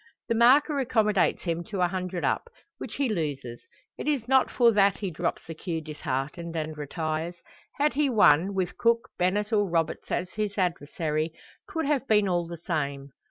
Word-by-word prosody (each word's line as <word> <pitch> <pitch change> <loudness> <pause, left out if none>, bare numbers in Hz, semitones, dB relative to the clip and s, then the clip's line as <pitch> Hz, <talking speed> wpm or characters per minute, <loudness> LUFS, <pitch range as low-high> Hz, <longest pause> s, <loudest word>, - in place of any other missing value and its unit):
The - - +3
marker 275 +6 +5
accommodates 220 -6 +2
him 170 -1 -2
to 200 -4 -3
a 180 - +4
hundred 180 -1 -3
up, 475 - 0 0.3
which 215 - -6
he 280 -1 +1
loses. 145 - -3 0.4
It - - -4
is 275 -6 0
not 265 0 +4
for 235 -2 +4
that 200 -2 +3
he 195 -3 -3
drops 170 +2 -3
the 165 - -6
cue 165 0 -4
disheartened, 155 +2 -4
and 155 -1 -3
retires. 155 +3 -3 0.4
Had 295 +1 +2
he 290 0 +2
won, 195 - +4
with 185 -2 -2
Cook, 230 0 +2
Bennett, 205 +5 +1
or 205 -2 +2
Roberts 165 -2 -1
as 180 +1 -2
his 210 -1 -3
adversary, 160 -3 -1 0.4
'twould 325 -2 -2
have 275 -2 0
been 210 -2 +4
all 175 -2 0
the 170 0 -7
same. 140 -5 -3
180 Hz, 180 wpm, -27 LUFS, 160-220 Hz, 0.4 s, marker